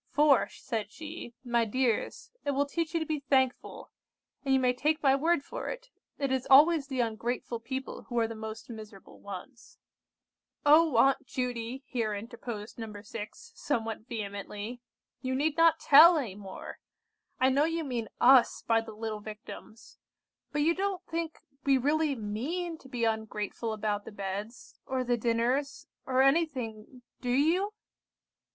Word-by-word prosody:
'For,' 290 -2 +4
said 220 -4 -4
she, 305 -5 -8
'my 240 -2 +2
dears, 240 0 -1
it 285 - 0
will 285 +1 +2
teach 330 +3 -3
you - - +3
to 320 - -2
be 310 -1 -2
thankful; 265 -2 0 0.5
and 275 - -1
you 265 - +5
may 250 -1 +3
take 305 +5 0
my 270 -1 +5
word 320 +1 +2
for - - -5
it, - - -7 0.3
it 275 -2 -1
is 265 -1 -1
always 295 +2 +7
the 260 -2 -1
ungrateful 235 +1 -2
people 260 +3 -6
who 240 - -3
are 230 -1 +3
the 230 - -6
most 220 0 -7
miserable 215 -4 -11
ones.'" 200 +6 -10 0.9
"Oh, 305 -3 +6
Aunt 270 +2 +4
Judy!" 250 0 -3
here 225 -4 -2
interposed 225 0 -7
No. 225 -1 -5
6, 220 - -8
somewhat 225 - -3
vehemently, 210 +1 -5 0.4
"you 260 0 -1
need 295 +3 +1
not 330 0 +5
tell 320 +4 +8
any 240 -10 -2
more! 195 -1 -9 0.6
I 260 - +5
know 280 +3 +3
you 330 0 -1
mean 245 -6 -3
us 255 0 +6
by 225 -1 +3
the 225 -1 -9
little 215 0 -4
Victims! 215 +2 -11 0.5
But 295 0 +1
you 330 +2 +4
don't 385 0 -2
think 330 -1 -3 0.3
we 275 -1 +4
really 295 +2 +1
mean 295 +11 -3
to 265 - -15
be 245 -3 -3
ungrateful 220 0 -2
about 210 -1 -2
the - - -8
beds, 205 +3 -6
or 260 -1 -1
the 245 -1 +1
dinners, 240 +4 0 0.2
or 260 0 +4
anything, 255 -6 0 0.2
do 250 - -3
you?" 330 +11 +2
255 Hz, 160 wpm, -30 LUFS, 225-290 Hz, 0.9 s, tell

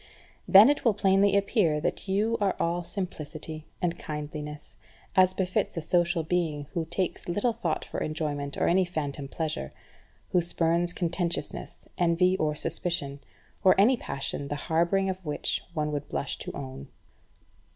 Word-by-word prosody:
Then 200 +3 +9
it 290 - -2
will 230 -5 +3
plainly 195 0 +4
appear 200 -6 +2
that 155 - -2
you 210 +4 +1
are 200 -2 +2
all 175 +1 0
simplicity 155 -4 -5 0.2
and 175 -1 0
kindliness, 150 0 -6 0.4
as 185 0 +5
befits 185 -2 -1
a - - 0
social 170 0 +2
being 160 -3 0
who 170 -3 -1
takes 175 +1 -3
little 205 +7 +1
thought 165 -7 -2
for - - -5
enjoyment 145 -2 -2
or - - +2
any 185 +2 +4
phantom 145 -5 -4
pleasure; 140 - -3 0.6
who 180 - +4
spurns 170 0 +1
contentiousness, 170 - -3
envy, 175 +2 +3
or 150 -3 0
suspicion; 160 -3 -2 0.4
or 190 0 +6
any 235 +7 +6
passion 140 - -4
the 145 - -2
harbouring 170 +6 +1
of 190 0 -3
which 150 -3 -1
one 150 -1 0
would 145 -1 -4
blush 70 -1 -2
to - - -5
own. 65 +1 -7
170 Hz, 150 wpm, -28 LUFS, 150-185 Hz, 0.6 s, Then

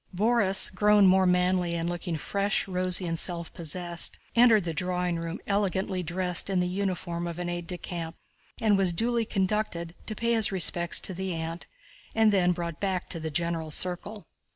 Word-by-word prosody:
Borís, 205 -2 +4
grown 210 +1 +5
more 190 0 +5
manly 180 -1 +2
and 165 0 -2
looking 175 -1 -3
fresh, 200 +5 -1
rosy 185 -1 0
and 165 -1 -2
self 170 -2 -2
possessed, 170 +1 -4 0.2
entered 230 -4 +6
the 165 -1 -3
drawing 180 +1 -1
room 165 +2 -4
elegantly 195 -2 0
dressed 180 +1 -1
in 190 -2 +1
the 180 - +1
uniform 180 -2 -3
of 170 -1 -6
an 175 0 -3
aide 175 -1 -4
de 180 - -3
camp 165 -2 -6 0.4
and 210 -3 +3
was 185 -3 +2
duly 230 +5 0
conducted 190 -4 -1
to 215 - -3
pay 235 +1 0
his 220 -3 +4
respects 175 -2 +2
to 190 - -1
the 185 -1 -3
aunt 165 +1 -5 0.5
and 220 -1 +4
then 180 -2 +3
brought 170 -2 -4
back 190 -3 -2
to 165 - -2
the 160 0 -4
general 165 0 -2
circle. 185 +6 -2
180 Hz, 180 wpm, -27 LUFS, 170-195 Hz, 0.5 s, entered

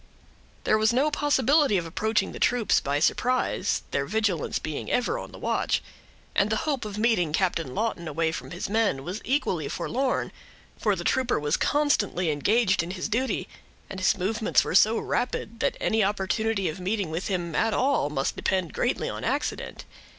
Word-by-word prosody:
There 215 - +3
was 215 +1 +4
no 275 +5 +2
possibility 285 -4 +3
of 175 - -2
approaching 215 +6 0
the - - -8
troops 245 -3 +3
by 140 +1 -1
surprise, 245 +5 +1
their 140 0 -1
vigilance 205 -6 0
being 155 -2 -5
ever 245 - 0
on - - -8
the - - -11
watch; - - 0 0.5
and 200 - +3
the 220 - +1
hope 280 -7 -1
of 210 -1 -6
meeting 210 -8 +2
Captain 165 -6 0
Lawton 210 -6 -2
away 160 +1 0
from - - -6
his 175 - -4
men, 205 -10 +1
was 185 +7 -5
equally 185 - 0
forlorn, 260 - -1 0.4
for - - +1
the - - -5
trooper 260 -7 +1
was 150 +1 +1
constantly 205 - +1
engaged 190 +5 +2
in 170 - -5
his 185 0 -3
duty, 255 +4 -1 0.4
and 190 - -5
his 185 - +2
movements 215 +4 +1
were - - -3
so 215 +4 +5
rapid, 230 -2 -2
that - - 0
any 220 -1 +2
opportunity 205 +1 0
of 155 +2 -4
meeting 190 -2 -2
with 165 +4 -3
him, 175 -4 -2
at 225 +6 +2
all, 260 - +1
must 135 -2 -1
depend 185 -4 -1
greatly - - 0
on - - -5
accident. - - -3
205 Hz, 180 wpm, -26 LUFS, 170-230 Hz, 0.5 s, so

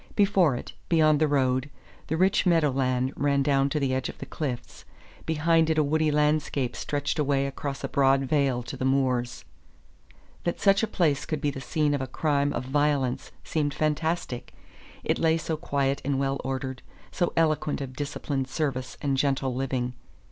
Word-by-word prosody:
Before 195 - +4
it, - - -7 0.2
beyond 155 -3 +4
the 155 - +3
road, 130 -1 +1 0.4
the 160 - -1
rich 190 +3 +3
meadow 165 -5 +4
land 130 0 0
ran 140 -1 +1
down 140 -1 +2
to 150 - -1
the 135 -2 0
edge 130 0 -1
of - - -9
the - - -7
cliffs; 130 -4 -5 0.4
behind 160 +1 +3
it 160 - +1
a 155 - +4
woody 155 +2 +1
landscape 150 -4 +1
stretched 145 +1 -2
away 140 -2 +2
across 140 0 -5
a - - 0
broad 135 0 +3
vale 135 -3 +1
to 120 - -7
the - - -5
moors. 130 -2 0 1.0
That 175 - -2
such 195 0 +4
a 225 - +1
place 150 -7 +1
could 155 - -2
be 145 - 0
the 135 - -7
scene 150 +3 0
of 140 - -1
a 130 - -3
crime 145 +1 0
of 120 - -3
violence 140 -2 0
seemed 145 -3 -1
fantastic; 155 -4 -2 0.5
it - - 0
lay 160 0 +3
so 160 0 -2
quiet 140 -3 -1
and 140 0 0
well 135 0 -1
ordered, 130 0 -4 0.3
so 175 - 0
eloquent 155 -2 +1
of 130 -2 -6
disciplined 140 -1 -3
service 130 -3 -3
and 140 -2 +1
gentle 135 -2 +1
living. 125 -1 -2
140 Hz, 180 wpm, -27 LUFS, 135-155 Hz, 1.0 s, Before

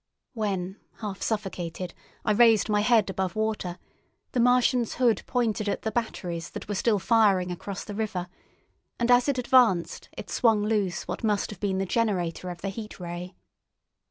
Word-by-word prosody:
When, 195 -4 -2 0.2
half 205 -3 -5
suffocated, 185 -4 -3 0.3
I - - +3
raised 225 0 +5
my 210 -1 +3
head 220 -3 +3
above 190 -2 -2
water, 215 -5 -2 0.5
the 250 - -1
Martian's 245 -1 +3
hood 240 -3 +3
pointed 220 -4 0
at - - -2
the 220 - -1
batteries 180 -7 -3
that - - -8
were 205 - -2
still 210 +2 +2
firing 195 -4 +3
across 185 +3 -5
the 205 - -7
river, 200 -4 -3 0.7
and 240 0 +1
as 245 +3 +5
it 275 - +1
advanced 240 -8 +3
it - - -7
swung 225 -4 +3
loose 205 -4 0
what - - -5
must 210 -2 +1
have 205 - -9
been 195 -2 0
the 195 - 0
generator 185 -5 -1
of 175 -1 -7
the 195 - -2
Heat 210 +1 -8
Ray. 175 +1 -6
210 Hz, 170 wpm, -27 LUFS, 185-230 Hz, 0.7 s, raised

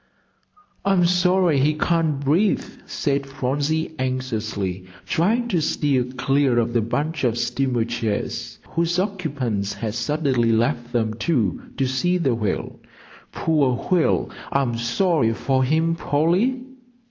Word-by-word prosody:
"I'm 195 -3 +3
sorry 180 -3 +3
he 150 +3 +2
can't 160 -2 +1
breathe," 160 +9 +2 0.2
said 140 -1 -1
Phronsie, 145 +4 -1
anxiously 110 -8 -3 0.2
trying 215 - +1
to 175 -7 +1
steer 140 -4 +1
clear 135 0 +1
of 120 0 +1
the 120 - +2
bunch 145 +7 -2
of 120 -2 +1
steamer 125 -2 0
chairs 115 0 -3
whose 170 +1 0
occupants 145 - -2
had 110 -2 -4
suddenly 125 -1 +1
left 120 +1 0
them, 110 -3 0
too, 115 - -1
to 135 - +1
see 175 +8 +1
the 140 -8 +1
whale. 110 -4 -3 0.5
"Poor 145 -6 +1 0.2
whale 175 -3 +2 0.2
I'm 135 -4 +1
sorry 120 +1 +1
for 130 +1 +1
him, 160 +5 +2
Polly." 180 - +1
135 Hz, 125 wpm, -22 LUFS, 120-165 Hz, 0.5 s, I'm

